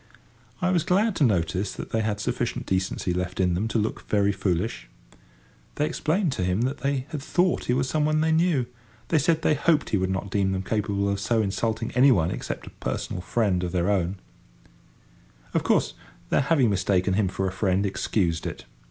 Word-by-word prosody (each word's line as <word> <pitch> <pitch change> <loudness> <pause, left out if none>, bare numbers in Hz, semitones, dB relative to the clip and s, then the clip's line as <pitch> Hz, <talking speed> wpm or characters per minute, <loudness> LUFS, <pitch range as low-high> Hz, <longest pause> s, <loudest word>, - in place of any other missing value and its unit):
I 185 - +3
was 175 -2 +3
glad 195 +5 +2
to - - +3
notice 95 -3 +1
that - - -8
they 110 - +1
had 105 -2 -1
sufficient 120 +1 -2
decency 95 -1 -1
left 90 +1 -3
in 90 -2 +2
them 95 +6 -1
to 115 - -1
look 110 0 -2
very 100 -1 +3
foolish. 95 - -2 0.9
They 150 - +1
explained 165 +3 0
to 95 - -2
him 90 +4 0
that 130 +3 -1
they 135 -1 -1
had 150 -4 -5
thought 180 +5 +1
he 125 - +1
was 130 0 0
some 150 +2 +1
one 155 0 +2
they 160 +1 +2
knew. 160 -5 +2 0.4
They 160 - +3
said 160 +2 +1
they - - +4
hoped 150 +1 +1
he 105 - +3
would 95 0 0
not 95 +1 -3
deem 95 -1 +1
them 95 0 -2
capable 100 -1 -1
of 100 0 0
so 110 +3 +1
insulting 110 +3 -2
any 130 +2 +5
one 85 -7 +2
except - - -5
a - - -10
personal 90 - -4
friend 95 -3 0
of 90 0 -3
their 90 +2 +1
own. 95 -1 0
[Picture: - - -19 1.3
Bathing] - - -27
Of - - +1
course - - +2 0.4
their - - +4
having 135 -5 +3
mistaken 95 -1 +1
him 100 0 +2
for 95 +1 -2
a - - -2
friend 95 +1 +1
excused 90 -4 -1
it. - - -7
105 Hz, 210 wpm, -25 LUFS, 95-140 Hz, 1.3 s, any